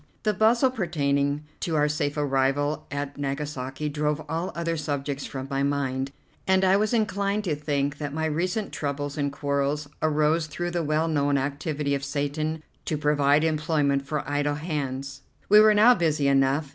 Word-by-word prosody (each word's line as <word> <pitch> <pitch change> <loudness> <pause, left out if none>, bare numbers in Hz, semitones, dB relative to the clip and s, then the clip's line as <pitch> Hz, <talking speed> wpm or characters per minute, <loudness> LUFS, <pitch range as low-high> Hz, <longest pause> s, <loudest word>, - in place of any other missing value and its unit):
The 215 - +2
bustle 235 +6 +3
pertaining 145 - 0 0.2
to 165 - -2
our 150 -1 +3
safe 145 0 -1
arrival 145 +1 0
at 145 0 -4
Nagasaki 140 0 -3
drove 150 0 -1
all 165 +4 -2
other 170 0 -1
subjects 145 -2 -3
from 130 -1 -5
my 135 0 -1
mind, 135 -1 -1 0.4
and 190 0 +4
I 190 +1 +5
was 210 +2 +1
inclined 210 -2 0
to 165 -7 0
think 145 -1 -2
that 145 -2 -3
my 160 +2 -2
recent 180 +7 -1
troubles 145 -1 -3
and 145 -1 -1
quarrels 140 +1 -1
arose 155 +1 +2
through 175 +4 -4
the 175 -1 -1
well 155 +2 +1
known 145 -3 +1
activity 145 +1 -2
of 140 -1 -1
Satan 150 +3 -2 0.2
to 155 - -1
provide 145 0 +3
employment 150 -3 +1
for 145 +1 -4
idle 145 +1 0
hands. 140 -3 -4 0.3
We 210 +1 +8
were 215 0 +6
now 225 +4 +7
busy 155 - +1
enough. 135 +2 +2
150 Hz, 170 wpm, -26 LUFS, 140-160 Hz, 0.4 s, We